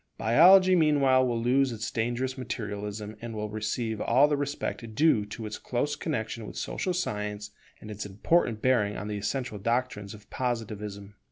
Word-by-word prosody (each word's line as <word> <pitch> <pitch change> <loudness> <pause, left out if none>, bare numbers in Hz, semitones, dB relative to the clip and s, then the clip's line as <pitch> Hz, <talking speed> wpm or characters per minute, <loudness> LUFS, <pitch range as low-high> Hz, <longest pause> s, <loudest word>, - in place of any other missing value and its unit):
Biology 185 - +6
meanwhile 140 -5 +4
will 120 -1 -1
lose 130 +3 +2
its 115 0 -4
dangerous 120 +3 -1
materialism, 105 -4 -5
and 115 -1 -6
will 105 -1 -4
receive 110 +1 -2
all 130 +5 +4
the 150 - +1
respect 140 -5 -4
due 115 -8 +3
to 110 +2 -7
its 105 0 -6
close 145 +4 -1
connexion 115 -7 -4
with - - -9
social 185 - -2
science 105 - -3 0.3
and 105 - -9
its 105 0 -5
important 110 - 0
bearing 110 -5 +2
on 105 +2 -5
the 105 - -3
essential 105 +1 -3
doctrines 115 -2 -2
of 105 - -16
Positivism. 105 -5 -4
115 Hz, 165 wpm, -28 LUFS, 105-130 Hz, 0.3 s, Biology